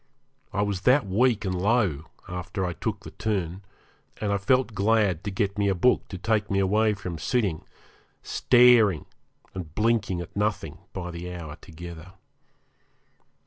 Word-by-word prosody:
I 105 Hz, 0 st, 0 dB
was 100 Hz, -3 st, -2 dB
that 130 Hz, +7 st, +4 dB
weak 110 Hz, +3 st, +2 dB
and 95 Hz, -, -1 dB
low, 95 Hz, -, +1 dB, 0.2 s
after 90 Hz, +2 st, -4 dB
I 90 Hz, -, -2 dB
took 100 Hz, +5 st, -4 dB
the -, -, -9 dB
turn, 95 Hz, -4 st, -2 dB, 0.6 s
and 105 Hz, -2 st, 0 dB
I 100 Hz, -, 0 dB
felt 130 Hz, +3 st, +2 dB
glad 100 Hz, -4 st, +2 dB
to -, -, -1 dB
get 100 Hz, +1 st, -1 dB
a 100 Hz, -2 st, +2 dB
book 125 Hz, +8 st, +2 dB
to 95 Hz, -, -7 dB
take 105 Hz, +1 st, 0 dB
me 100 Hz, -, 0 dB
away 105 Hz, +3 st, +2 dB
from 90 Hz, -4 st, -6 dB
sitting, 100 Hz, -, 0 dB, 0.6 s
staring, 120 Hz, -8 st, +5 dB, 0.5 s
and 85 Hz, -4 st, -7 dB
blinking 110 Hz, -5 st, +1 dB
at 85 Hz, -, -8 dB
nothing 105 Hz, +1 st, -2 dB
by 90 Hz, -1 st, -5 dB
the 85 Hz, +1 st, -6 dB
hour 85 Hz, -4 st, -7 dB
together. 85 Hz, +1 st, -10 dB
100 Hz, 150 wpm, -26 LUFS, 90-110 Hz, 0.6 s, staring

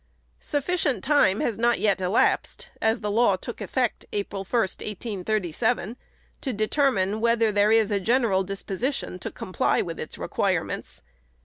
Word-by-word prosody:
Sufficient 290 Hz, -, -1 dB
time 265 Hz, -9 st, +3 dB
has 225 Hz, -3 st, -1 dB
not 235 Hz, +1 st, +3 dB
yet 200 Hz, -2 st, +1 dB
elapsed 185 Hz, +4 st, +1 dB
(as 225 Hz, +1 st, +1 dB
the 210 Hz, -1 st, -2 dB
law 220 Hz, -2 st, +4 dB
took 230 Hz, +5 st, -8 dB
effect 250 Hz, -4 st, -1 dB
April 200 Hz, -1 st, -3 dB
1, 235 Hz, +5 st, 0 dB
1837) 210 Hz, +1 st, -2 dB, 0.5 s
to 270 Hz, -, -2 dB
determine 215 Hz, -2 st, +1 dB
whether 230 Hz, -1 st, +3 dB
there 205 Hz, +1 st, +3 dB
is 220 Hz, -1 st, +4 dB
a 200 Hz, -, +2 dB
general 225 Hz, -2 st, +2 dB
disposition 195 Hz, -, -3 dB
to -, -, -4 dB
comply -, -, 0 dB
with -, -, -6 dB
its -, -, -6 dB
requirements. -, -, -2 dB
215 Hz, 140 wpm, -25 LUFS, 195-240 Hz, 0.5 s, law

